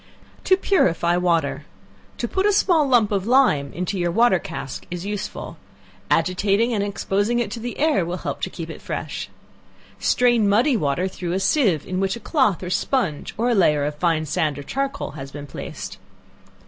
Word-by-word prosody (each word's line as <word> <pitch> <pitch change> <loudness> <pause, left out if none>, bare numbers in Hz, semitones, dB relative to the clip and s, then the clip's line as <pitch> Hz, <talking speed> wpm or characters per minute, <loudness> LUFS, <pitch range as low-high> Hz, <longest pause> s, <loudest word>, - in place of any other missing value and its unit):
To 375 - +5
Purify 175 - +2
Water. 170 -5 0 0.5
To - - -2
put 385 +1 +1
a 415 - +3
small 340 -7 +3
lump 240 -5 +3
of 200 0 -1
lime 235 - +3
into 180 +2 -3
your 175 -1 +1
water 210 0 +4
cask 135 -4 -7
is 175 +1 -5
useful. 205 -1 -5 0.5
Agitating 200 +5 +2
and 205 -2 0
exposing 205 +3 0
it 235 -4 -1
to 230 - -5
the 240 +1 -5
air, 300 - +2
will 175 +2 -3
help - - -5
to - - -1
keep - - -7
it - - -10
fresh. - - -5 0.7
Strain 240 -4 +3
muddy 240 +7 +3
water 160 -1 0
through 180 -2 -4
a 190 - 0
sieve, 195 - +2
in 185 0 -3
which 195 +1 0
a - - -8
cloth 230 - +1
or 180 - -4
sponge, 210 - -1
(or 240 +3 +1
a - - +3
layer 150 -8 +3
of 150 - -2
fine 155 0 0
sand 155 -1 -1
or 145 - -6
charcoal,) 275 - -3
has 140 -2 -8
been 145 0 -7
placed. - - -7
195 Hz, 185 wpm, -22 LUFS, 170-240 Hz, 0.7 s, To